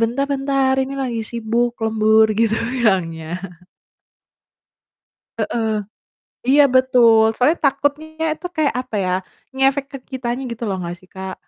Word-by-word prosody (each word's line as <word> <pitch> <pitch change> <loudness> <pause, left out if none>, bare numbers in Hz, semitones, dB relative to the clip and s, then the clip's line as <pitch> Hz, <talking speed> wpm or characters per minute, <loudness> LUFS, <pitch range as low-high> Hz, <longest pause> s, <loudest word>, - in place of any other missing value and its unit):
bentar-bentar 275 +2 +1
ini 270 +1 -3
lagi 235 -3 -2
sibuk 235 +1 -1
lembur," 220 0 +4
gitu 225 -1 +3 0.2
bilangnya. 180 -10 0 2.1
Heeh. 225 -2 -1 0.8
Iya 290 +2 +6
betul, 235 -4 +5
soalnya 275 +9 +2
takutnya 290 +3 0
itu 360 - -7
kayak 305 -3 +1
apa 255 -4 -6
ya, 180 - -1 0.5
ngefek 270 +1 +2
ke 275 - -6
kitanya 250 0 -3
gitu 235 0 -9
loh 190 - -1
nggak 175 0 -5
sih, 185 - -21
Kak? 190 0 -6
240 Hz, 125 wpm, -20 LUFS, 220-275 Hz, 2.1 s, Iya